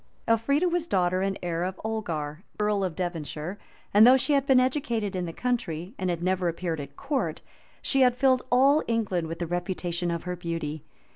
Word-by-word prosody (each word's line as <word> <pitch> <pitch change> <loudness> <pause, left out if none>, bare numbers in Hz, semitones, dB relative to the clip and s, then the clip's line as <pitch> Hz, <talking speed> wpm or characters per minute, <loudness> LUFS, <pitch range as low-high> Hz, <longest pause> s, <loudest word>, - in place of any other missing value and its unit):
Elfrida 280 +9 +2
was 345 -1 -1
daughter 185 - +1
and 195 0 -1
heir 170 -1 -1
of 185 0 -4
Olgar, 165 -9 -3 0.2
earl 210 -1 +1
of 180 -4 -2
Devonshire; 175 +1 -4 0.3
and 210 +3 +8
though 260 +1 +8
she 290 +3 0
had 275 -1 +2
been 265 -2 +6
educated 235 -6 0
in 180 -1 -2
the - - -4
country, 195 -6 -2
and 185 - -1
had 170 -1 -2
never 185 0 +1
appeared 170 -1 -2
at 140 - -8
court, 280 -2 -2 0.4
she 270 - +2
had 250 -1 +4
filled 260 -1 +4
all 275 +4 +5
England 205 -8 0
with 165 +1 -5
the 175 - -2
reputation 175 0 -2
of 170 -1 -2
her 180 0 -3
beauty. 165 -3 -4
185 Hz, 195 wpm, -27 LUFS, 170-245 Hz, 0.4 s, and